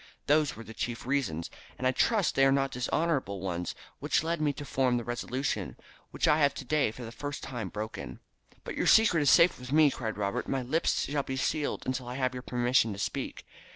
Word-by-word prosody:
Those 150 Hz, 0 st, +3 dB
were 115 Hz, -, -9 dB
the 110 Hz, -, -10 dB
chief 120 Hz, +1 st, -4 dB
reasons, 125 Hz, -, -1 dB, 0.3 s
and 130 Hz, -, -4 dB
I 130 Hz, -, +4 dB
trust 210 Hz, -, +2 dB
that -, -, +1 dB
they -, -, +7 dB
are -, -, +4 dB
not 135 Hz, 0 st, +1 dB
dishonourable 130 Hz, -, -1 dB
ones, 90 Hz, -2 st, -3 dB, 0.2 s
which -, -, +1 dB
led 165 Hz, 0 st, -1 dB
me 150 Hz, -1 st, +2 dB
to 145 Hz, -, -8 dB
form 130 Hz, -3 st, +1 dB
the 120 Hz, -, -3 dB
resolution, 120 Hz, +3 st, -3 dB, 0.3 s
which -, -, 0 dB
I 150 Hz, -, +4 dB
have 145 Hz, -2 st, +3 dB
today 140 Hz, 0 st, +1 dB
for 120 Hz, +3 st, -9 dB
the 115 Hz, -, -7 dB
first 145 Hz, +3 st, -6 dB
time 120 Hz, -7 st, -5 dB
broken." 110 Hz, +3 st, -6 dB, 0.4 s
"But -, -, -6 dB
your -, -, 0 dB
secret 215 Hz, -8 st, +6 dB
is 145 Hz, -, +4 dB
safe 170 Hz, +1 st, +5 dB
with 125 Hz, +1 st, -8 dB
me," 150 Hz, -1 st, +5 dB
cried 110 Hz, -5 st, -4 dB
Robert. 100 Hz, -1 st, -2 dB
"My 135 Hz, -1 st, -1 dB
lips 155 Hz, +7 st, +1 dB
shall 145 Hz, 0 st, 0 dB
be 130 Hz, -1 st, -5 dB
sealed 145 Hz, +2 st, -1 dB
until 130 Hz, -1 st, -3 dB
I 125 Hz, -, -5 dB
have 130 Hz, -1 st, 0 dB
your 125 Hz, -, -5 dB
permission 120 Hz, -3 st, +1 dB
to -, -, -8 dB
speak." -, -, -4 dB
130 Hz, 220 wpm, -29 LUFS, 120-145 Hz, 0.4 s, they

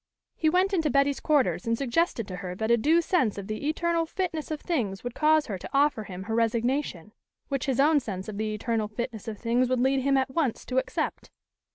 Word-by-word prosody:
He 315 Hz, -, +2 dB
went 370 Hz, +4 st, +2 dB
into 325 Hz, -5 st, +2 dB
Betty's 275 Hz, +1 st, +2 dB
quarters 285 Hz, -5 st, +1 dB
and 230 Hz, 0 st, +1 dB
suggested 270 Hz, -, 0 dB
to 185 Hz, -, -6 dB
her 180 Hz, -1 st, -5 dB
that 220 Hz, +4 st, -1 dB
a -, -, +7 dB
due 315 Hz, +9 st, +3 dB
sense 260 Hz, -, +1 dB
of 200 Hz, -, -5 dB
the 215 Hz, +8 st, -3 dB
eternal 335 Hz, +1 st, 0 dB
fitness 335 Hz, -4 st, -3 dB
of 310 Hz, -1 st, -3 dB
things 225 Hz, -, -2 dB
would 245 Hz, -1 st, -4 dB
cause 310 Hz, +1 st, +3 dB
her 195 Hz, -4 st, -5 dB
to -, -, -8 dB
offer 275 Hz, -6 st, +2 dB
him 185 Hz, -1 st, -7 dB
her 220 Hz, +3 st, -4 dB
resignation, 230 Hz, -, 0 dB, 0.4 s
which 275 Hz, -1 st, -2 dB
his 265 Hz, -2 st, 0 dB
own 295 Hz, +2 st, +5 dB
sense 195 Hz, -7 st, -6 dB
of 210 Hz, -1 st, -6 dB
the 215 Hz, 0 st, -1 dB
eternal 220 Hz, 0 st, -1 dB
fitness 225 Hz, +1 st, -5 dB
of 215 Hz, -2 st, -4 dB
things 240 Hz, +3 st, +1 dB
would 255 Hz, -1 st, +1 dB
lead 265 Hz, +2 st, +2 dB
him 275 Hz, +1 st, +2 dB
at 265 Hz, 0 st, 0 dB
once 270 Hz, -5 st, -1 dB
to 255 Hz, 0 st, +1 dB
accept. -, -, -3 dB
255 Hz, 225 wpm, -27 LUFS, 220-300 Hz, 0.4 s, a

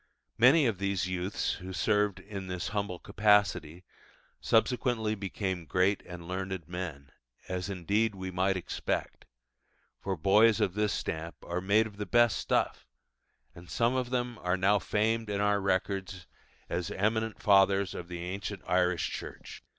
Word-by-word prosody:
Many 135 Hz, +5 st, +6 dB
of 110 Hz, -6 st, 0 dB
these 100 Hz, -2 st, 0 dB
youths 90 Hz, +2 st, -2 dB
who 95 Hz, +1 st, -7 dB
served 105 Hz, -1 st, +1 dB
in 100 Hz, -1 st, -7 dB
this 90 Hz, -2 st, -3 dB
humble 100 Hz, -3 st, -2 dB
capacity 100 Hz, -5 st, +2 dB, 0.6 s
subsequently 115 Hz, -1 st, +1 dB
became 95 Hz, -4 st, -4 dB
great 95 Hz, +2 st, +2 dB
and 85 Hz, -1 st, -9 dB
learned 95 Hz, -2 st, -4 dB
men, 85 Hz, -6 st, -6 dB, 0.4 s
as 90 Hz, +1 st, -3 dB
indeed 100 Hz, +4 st, 0 dB
we 95 Hz, -1 st, -5 dB
might 95 Hz, +1 st, +1 dB
expect, 90 Hz, -, -3 dB, 0.7 s
for -, -, -3 dB
boys 105 Hz, +6 st, +5 dB
of 90 Hz, -, +1 dB
this 105 Hz, 0 st, 0 dB
stamp 85 Hz, -3 st, -4 dB
are 90 Hz, +1 st, -3 dB
made 105 Hz, +4 st, +3 dB
of 105 Hz, -2 st, -10 dB
the 105 Hz, -1 st, -4 dB
best 120 Hz, 0 st, +4 dB
stuff; -, -, -1 dB, 0.7 s
and 85 Hz, 0 st, -13 dB
some 115 Hz, +1 st, +1 dB
of 130 Hz, -1 st, -1 dB
them 120 Hz, -2 st, -2 dB
are 90 Hz, +1 st, 0 dB
now 100 Hz, +2 st, +3 dB
famed 110 Hz, +2 st, 0 dB
in 100 Hz, -1 st, -1 dB
our 105 Hz, 0 st, +2 dB
records 95 Hz, -1 st, -1 dB, 0.4 s
as 85 Hz, 0 st, -2 dB
eminent 110 Hz, +2 st, -1 dB
fathers 100 Hz, -2 st, +4 dB
of 85 Hz, -, -7 dB
the 85 Hz, -1 st, -6 dB
ancient 95 Hz, +2 st, -5 dB
Irish 90 Hz, -1 st, +1 dB
Church. -, -, -8 dB
95 Hz, 150 wpm, -30 LUFS, 90-105 Hz, 0.7 s, Many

